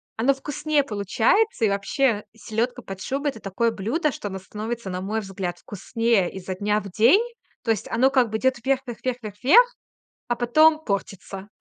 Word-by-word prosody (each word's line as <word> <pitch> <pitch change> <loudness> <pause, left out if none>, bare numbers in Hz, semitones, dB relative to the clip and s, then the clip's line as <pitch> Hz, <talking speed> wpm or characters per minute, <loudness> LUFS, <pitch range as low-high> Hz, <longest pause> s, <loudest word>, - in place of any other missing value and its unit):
оно 250 +5 +3
вкуснее 295 +1 -1
получается. 225 - +1
И - - +3
вообще, 205 +3 +1
селёдка 235 +3 -2
под 195 -3 -8
шубой- 280 +4 -1
это 225 - -12
такое 225 +4 0
блюдо, 240 - -1
что 205 - -6
оно 190 -1 -5
становится, 215 +2 -5
на 180 0 -4
мой 215 +3 -2
взгляд, 190 -3 -5
вкуснее 220 -1 0
изо 185 -1 -5
дня 210 +2 +1
в 200 - -8
день. 255 - +5 0.4
То 225 - +1
есть 215 - -2
оно 260 +4 +3
как 255 -4 +3
бы 220 - -1
идёт 260 +2 +2
вверх, 270 0 +1
вверх, 240 -2 -7
вверх, 255 -1 -1
вверх, 205 -2 -7
вверх, 485 - +6 0.5
а 240 - 0
потом 310 +6 +4
портится. 195 0 -4
225 Hz, 185 wpm, -24 LUFS, 200-265 Hz, 0.5 s, вверх